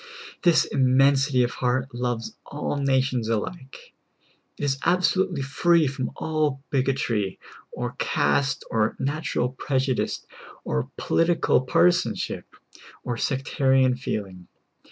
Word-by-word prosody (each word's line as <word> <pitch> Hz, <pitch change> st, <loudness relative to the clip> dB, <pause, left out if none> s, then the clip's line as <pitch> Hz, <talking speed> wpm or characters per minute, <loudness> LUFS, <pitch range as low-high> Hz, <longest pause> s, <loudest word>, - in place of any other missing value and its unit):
This 170 Hz, -4 st, +4 dB
immensity 135 Hz, 0 st, +3 dB
of 120 Hz, -, -1 dB
heart 130 Hz, +1 st, -1 dB
loves 120 Hz, -2 st, -3 dB
all 145 Hz, 0 st, -4 dB
nations 130 Hz, -4 st, +1 dB
alike; 130 Hz, -, -5 dB, 0.6 s
it -, -, -6 dB
is 135 Hz, -1 st, 0 dB
absolutely 180 Hz, -2 st, +2 dB
free 165 Hz, +4 st, +3 dB
from 130 Hz, -2 st, -2 dB
all 155 Hz, -3 st, -1 dB
bigotry, 130 Hz, -7 st, 0 dB, 0.3 s
or -, -, -4 dB
caste, 135 Hz, -, +1 dB
or 110 Hz, -1 st, +1 dB
nat 145 Hz, +4 st, -3 dB
ural 125 Hz, -, +1 dB
prejudice, 130 Hz, 0 st, -1 dB, 0.4 s
or 65 Hz, -, -2 dB
political 165 Hz, -5 st, +2 dB
partisanship, 175 Hz, +7 st, +1 dB, 0.5 s
or 120 Hz, -, -2 dB
sectarian 130 Hz, 0 st, +2 dB
feeling. 95 Hz, -8 st, -5 dB
135 Hz, 110 wpm, -25 LUFS, 125-145 Hz, 0.6 s, This